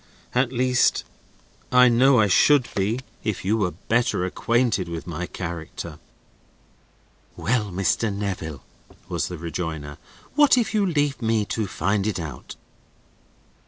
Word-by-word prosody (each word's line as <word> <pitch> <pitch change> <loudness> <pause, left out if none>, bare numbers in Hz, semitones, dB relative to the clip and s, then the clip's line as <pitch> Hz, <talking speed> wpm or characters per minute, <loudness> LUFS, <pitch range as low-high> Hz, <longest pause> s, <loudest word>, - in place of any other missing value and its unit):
At 125 0 +2
least 125 0 +2 0.7
I 125 0 +7
know 125 +2 +5
I 110 - +5
should 130 +6 +4
be, 105 +6 0 0.2
if 105 -4 -3
you 105 +3 +2
were 100 -5 +1
better 105 +2 0
acquainted 115 -1 0
with 85 -1 -5
my 85 +1 -4
character." 85 -3 -6 1.4
"Well, 110 -3 0
Mr. 100 +4 0
Neville," 95 -7 -4 0.4
was - - -2
the 90 - -6
rejoinder. 80 -3 -5 0.3
"What 290 -2 +5
if 235 -2 +1
you 205 -2 +2
leave 145 -5 0
me 110 -2 +1
to 110 -3 -1
find 100 +1 0
it 105 - -1
out?" 75 -7 -7
105 Hz, 130 wpm, -24 LUFS, 90-125 Hz, 1.4 s, I